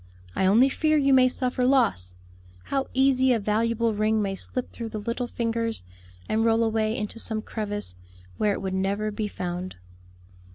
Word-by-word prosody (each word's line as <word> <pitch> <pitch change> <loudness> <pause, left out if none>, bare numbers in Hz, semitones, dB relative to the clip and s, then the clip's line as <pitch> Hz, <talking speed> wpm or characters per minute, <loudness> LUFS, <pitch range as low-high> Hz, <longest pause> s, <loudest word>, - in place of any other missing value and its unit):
I 190 - +2
only 230 +7 +6
fear 310 +3 +1
you 275 -2 +3
may 255 -1 +6
suffer 250 0 -1
loss. 230 - +2 0.5
How 270 -1 -2
easy 265 -1 +3
a 230 - +1
valuable 225 +2 +1
ring 215 +1 +1
may 200 -2 -1
slip 250 +6 -4
through 230 -1 -6
the 215 - -5
little 235 +4 -3
fingers 230 - -2 0.4
and 220 +1 +1
roll 225 0 +3
away 220 0 0
into 210 +2 -5
some 220 -1 -3
crevice 205 - -4 0.5
where 210 -1 +2
it - - -5
would 190 -1 -2
never 200 +3 -1
be 210 0 -3
found." 180 -1 -5
225 Hz, 170 wpm, -26 LUFS, 205-250 Hz, 0.5 s, only